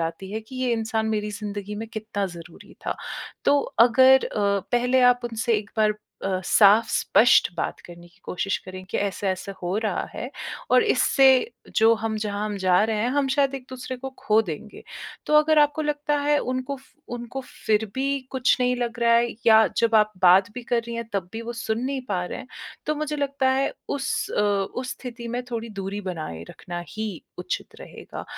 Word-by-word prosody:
आती 165 Hz, +4 st, -4 dB
है 220 Hz, -, -3 dB
कि 260 Hz, -, -9 dB
ये 245 Hz, -, +1 dB
इंसान 225 Hz, -1 st, -1 dB
मेरी 210 Hz, -1 st, -1 dB
ज़िंदगी 205 Hz, 0 st, -5 dB
में 225 Hz, +2 st, -5 dB
कितना 215 Hz, -2 st, -3 dB
ज़रूरी 170 Hz, -2 st, -12 dB
था। -, -, -1 dB, 0.5 s
तो 285 Hz, 0 st, +4 dB, 0.3 s
अगर 260 Hz, +2 st, +6 dB
अ, 200 Hz, -1 st, 0 dB
पहले 250 Hz, +2 st, +3 dB
आप 245 Hz, -, -10 dB
उनसे 230 Hz, 0 st, 0 dB
एक 205 Hz, -1 st, -10 dB
बार 215 Hz, -1 st, +4 dB, 0.3 s
अ, 190 Hz, -1 st, 0 dB
साफ़-स्पष्ट 220 Hz, +3 st, +5 dB
बात -, -, -3 dB
करने 175 Hz, 0 st, -13 dB
की 170 Hz, -, -28 dB
कोशिश 195 Hz, +2 st, -1 dB
करें 185 Hz, 0 st, -8 dB
कि -, -, -1 dB
ऐसा-ऐसा 200 Hz, -1 st, -2 dB
हो 180 Hz, +3 st, -1 dB
रहा 220 Hz, -1 st, -1 dB
है -, -, -5 dB, 0.4 s
और -, -, +6 dB
इससे 275 Hz, -10 st, +4 dB, 0.5 s
जो 225 Hz, 0 st, +6 dB
हम, 220 Hz, 0 st, -3 dB
जहाँ 210 Hz, -1 st, -2 dB
हम 210 Hz, -1 st, -3 dB
जा 185 Hz, +1 st, +3 dB
रहे 220 Hz, -1 st, -1 dB
हैं 240 Hz, -, +1 dB
हम 280 Hz, 0 st, +1 dB
शायद 275 Hz, 0 st, +2 dB
एक-दूसरे 260 Hz, -1 st, -7 dB
को 265 Hz, +1 st, -6 dB
ख़ो 215 Hz, +1 st, +3 dB
देंगे। 175 Hz, +1 st, -8 dB, 0.4 s
तो 300 Hz, -, +1 dB
अगर 310 Hz, 0 st, +3 dB
आपको 295 Hz, +1 st, +3 dB
लगता 295 Hz, 0 st, 0 dB
है 295 Hz, 0 st, +2 dB
उनको 255 Hz, +1 st, -3 dB
फ 265 Hz, -, -19 dB, 0.3 s
उनको 240 Hz, +2 st, -6 dB, 0.3 s
फ़िर 220 Hz, 0 st, +3 dB
भी 275 Hz, +1 st, 0 dB
कुछ 260 Hz, -1 st, +2 dB
नहीं 250 Hz, 0 st, +2 dB
लग 240 Hz, -1 st, -3 dB
रहा 235 Hz, 0 st, +4 dB
है 235 Hz, +1 st, +3 dB, 0.2 s
या 220 Hz, 0 st, +7 dB
जब 230 Hz, -1 st, +2 dB
आप 215 Hz, 0 st, +3 dB
बात 185 Hz, +2 st, +6 dB
भी 250 Hz, -, -6 dB
कर 235 Hz, 0 st, 0 dB
रही 235 Hz, -, -5 dB
हैं 235 Hz, -, -3 dB
तब 190 Hz, -3 st, -2 dB
भी 225 Hz, -, -5 dB
वो 235 Hz, +1 st, -5 dB
सुन 225 Hz, -1 st, -2 dB
नहीं 270 Hz, 0 st, -2 dB
पा 180 Hz, -3 st, -1 dB
रहे -, -, -6 dB
हैं। 255 Hz, -, -9 dB, 0.4 s
तो 305 Hz, -, +1 dB
मुझे 300 Hz, 0 st, -2 dB
लगता 280 Hz, -2 st, +1 dB
है 265 Hz, +1 st, +1 dB, 0.2 s
उस 285 Hz, +2 st, -2 dB
अ, -, -, 0 dB
उस 205 Hz, +5 st, -1 dB
स्थिति 240 Hz, -2 st, -8 dB
में 245 Hz, +2 st, -3 dB
थोड़ी 230 Hz, -1 st, -4 dB
दूरी 195 Hz, +2 st, -4 dB
बनाए 160 Hz, -, -5 dB
रखना 175 Hz, -1 st, -7 dB
ही 220 Hz, 0 st, -4 dB, 0.3 s
उचित -, -, -4 dB
रहेगा। -, -, -9 dB
225 Hz, 195 wpm, -24 LUFS, 205-260 Hz, 0.5 s, या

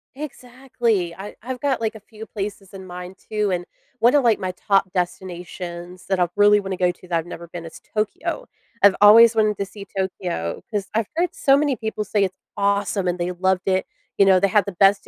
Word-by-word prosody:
Exactly. 245 Hz, -, -2 dB
I 195 Hz, +3 st, -9 dB
I've 250 Hz, +1 st, -5 dB
got, 270 Hz, -5 st, 0 dB
like, 220 Hz, 0 st, -1 dB
a -, -, -9 dB
few 220 Hz, +1 st, -11 dB
places 200 Hz, -2 st, -6 dB
in 190 Hz, -1 st, -9 dB
mind 180 Hz, +1 st, -8 dB, 0.2 s
too, 210 Hz, -2 st, 0 dB
and 175 Hz, -1 st, -2 dB, 0.3 s
one 240 Hz, +4 st, +5 dB
of, 280 Hz, -, +4 dB
like, 230 Hz, -3 st, +3 dB
my 185 Hz, -1 st, -2 dB
top 195 Hz, 0 st, +1 dB
destinations 180 Hz, -1 st, -5 dB
that 190 Hz, -1 st, 0 dB
I 175 Hz, -, +3 dB
really 205 Hz, 0 st, +6 dB
wanna 190 Hz, -2 st, -4 dB
go 180 Hz, -1 st, +2 dB
to 180 Hz, +1 st, -17 dB
that 170 Hz, -1 st, 0 dB
I've 165 Hz, -, -2 dB
never 170 Hz, -1 st, -9 dB
been 170 Hz, 0 st, -8 dB
is 160 Hz, -, -10 dB, 0.2 s
Tokyo. 215 Hz, -, -2 dB, 0.4 s
I've 200 Hz, -1 st, +7 dB
always 225 Hz, +3 st, +9 dB
wanted 215 Hz, -2 st, +2 dB
to 200 Hz, -, -2 dB
see 200 Hz, +1 st, -11 dB
Tokyo 180 Hz, -, -3 dB
'cause 205 Hz, -3 st, -2 dB
I've 220 Hz, -1 st, 0 dB
heard 355 Hz, +2 st, 0 dB
so 275 Hz, -8 st, +4 dB
many 285 Hz, -3 st, +1 dB
people 220 Hz, -1 st, -3 dB
say 205 Hz, 0 st, +1 dB
it's 185 Hz, -, -6 dB, 0.2 s
awesome 200 Hz, -1 st, 0 dB
and 175 Hz, 0 st, 0 dB
they 175 Hz, +1 st, -2 dB
loved 185 Hz, +1 st, 0 dB
it, 190 Hz, 0 st, +1 dB, 0.3 s
you 200 Hz, -, +6 dB
know, 190 Hz, -1 st, +6 dB
they 200 Hz, -, +3 dB
had 210 Hz, +1 st, +3 dB
the 200 Hz, -, -4 dB
best 195 Hz, +3 st, +3 dB
195 Hz, 220 wpm, -22 LUFS, 180-220 Hz, 0.4 s, always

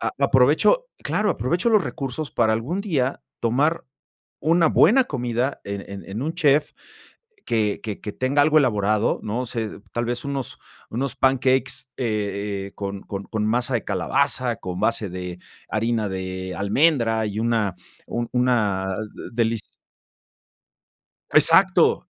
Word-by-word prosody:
a -, -, -1 dB
aprovecho -, -, +4 dB, 0.2 s
claro, 210 Hz, -1 st, +1 dB
aprovecho 170 Hz, -, 0 dB
los 215 Hz, -3 st, +5 dB
recursos 140 Hz, 0 st, -4 dB
para 110 Hz, 0 st, +2 dB
algún 150 Hz, -, -2 dB
día 140 Hz, -10 st, -1 dB, 0.2 s
tomar 140 Hz, +8 st, +1 dB, 0.6 s
una 165 Hz, +1 st, +4 dB
buena 260 Hz, +3 st, +5 dB
comida 125 Hz, -, -2 dB
en 100 Hz, 0 st, -4 dB
en 100 Hz, 0 st, -7 dB
en 105 Hz, +6 st, -4 dB
un 160 Hz, +3 st, -2 dB
chef 150 Hz, -3 st, +3 dB, 0.8 s
que 110 Hz, -3 st, 0 dB
que 105 Hz, -3 st, -5 dB
que 105 Hz, -, -5 dB
tenga 135 Hz, +3 st, +1 dB
algo 155 Hz, +1 st, +5 dB
elaborado. 105 Hz, -5 st, +2 dB
No 115 Hz, +4 st, -2 dB
sé, 110 Hz, -3 st, -4 dB
tal 120 Hz, 0 st, -1 dB
vez 120 Hz, +2 st, -3 dB
unos 140 Hz, -2 st, -4 dB, 0.3 s
unos 130 Hz, +2 st, -2 dB
pancakes, 130 Hz, -1 st, +1 dB
eh, 100 Hz, -4 st, -2 dB
eh, -, -, -18 dB
con 100 Hz, -1 st, -4 dB
con 100 Hz, 0 st, -6 dB
con 110 Hz, -2 st, -2 dB
masa 120 Hz, +3 st, 0 dB
de 115 Hz, -, +1 dB
calabaza, 125 Hz, -2 st, 0 dB
con 90 Hz, -1 st, -6 dB
base 110 Hz, -3 st, +1 dB
de 90 Hz, -1 st, -6 dB, 0.3 s
harina 110 Hz, -1 st, 0 dB
de 95 Hz, 0 st, -4 dB
almendra 115 Hz, +1 st, +2 dB
y 105 Hz, +1 st, -3 dB
una 115 Hz, -5 st, +1 dB, 0.3 s
un 120 Hz, 0 st, -3 dB
una 105 Hz, -7 st, +1 dB, 0.2 s
de -, -, -9 dB
delis 115 Hz, -2 st, -1 dB, 1.6 s
Exacto. -, -, +5 dB
120 Hz, 140 wpm, -23 LUFS, 105-135 Hz, 1.6 s, los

